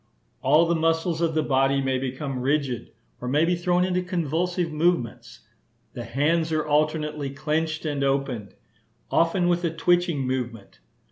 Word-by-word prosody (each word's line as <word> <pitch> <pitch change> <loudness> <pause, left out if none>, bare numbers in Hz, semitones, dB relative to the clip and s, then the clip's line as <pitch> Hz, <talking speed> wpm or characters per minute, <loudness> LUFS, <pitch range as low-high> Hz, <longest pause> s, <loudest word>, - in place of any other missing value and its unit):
All 150 +5 +5
the 170 - +1
muscles 165 +1 0
of 165 -2 +1
the 155 - +2
body 135 0 +2
may 135 -1 0
become 135 +1 -4
rigid, 135 -2 -1 0.3
or - - -4
may 145 +5 +3
be 175 - +2
thrown 175 +1 +1
into 180 0 0
convulsive 175 0 -1
movements. 155 -5 -1 0.5
The 120 - -6
hands 155 +7 +1
are 155 -1 0
alternately 150 -1 0
clenched 155 +3 -2
and 145 -2 -1
opened, 135 -6 -1 0.6
often 175 +2 +2
with 175 0 +1
a 170 - +2
twitching 175 -2 +1
movement. 120 -5 -4
155 Hz, 150 wpm, -25 LUFS, 135-170 Hz, 0.6 s, All